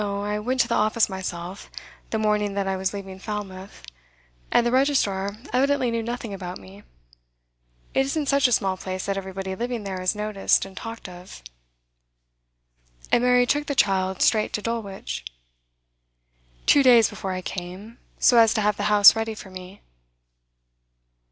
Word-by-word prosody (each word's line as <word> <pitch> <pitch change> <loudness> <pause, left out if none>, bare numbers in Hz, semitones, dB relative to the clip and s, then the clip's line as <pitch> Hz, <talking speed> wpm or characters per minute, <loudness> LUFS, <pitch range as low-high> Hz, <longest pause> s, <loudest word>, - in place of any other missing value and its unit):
I 205 +1 -2
went 255 +5 -2
to - - 0
the 235 - -1
office 215 +1 +2
myself, 185 -1 -6 0.4
the 220 - -1
morning 210 -2 0
that 200 -1 -1
I 190 - 0
was 190 0 -1
leaving 195 -2 -8
Falmouth, 195 -2 -7 0.7
and 240 - +3
the 240 - +1
registrar 210 -7 +1 0.2
evidently 265 -1 +2
knew 230 0 -1
nothing 235 -2 -5
about 185 -2 -6
me. 95 +1 -14 1.1
It - - +1
isn't 300 +2 -1
such 280 -1 +3
a - - -3
small 190 -4 +1
place 185 0 -5
that 195 - -1
everybody 190 0 -5
living 240 0 -4
there 190 -2 -5
is 185 +3 0
noticed 210 -2 +1
and 195 -1 -12
talked 225 0 -7
of.' 180 - -12 1.7
'And 240 - +3
Mary 250 0 +4
took 290 +4 0
the 285 - -2
child 190 -6 +1
straight 215 -2 +2
to 210 - -2
Dulwich?' 225 -4 -4 1.4
'Two 285 - +6
days 240 -4 +6
before 190 -1 -5
I 185 0 -5
came, 190 +7 -7 0.2
so 240 - +5
as 225 -1 +5
to 215 - +1
have 210 0 +1
the 205 - -2
house 205 0 +8
ready 225 0 -3
for 195 -2 -11
me. 185 +2 -11
205 Hz, 165 wpm, -24 LUFS, 190-235 Hz, 1.7 s, house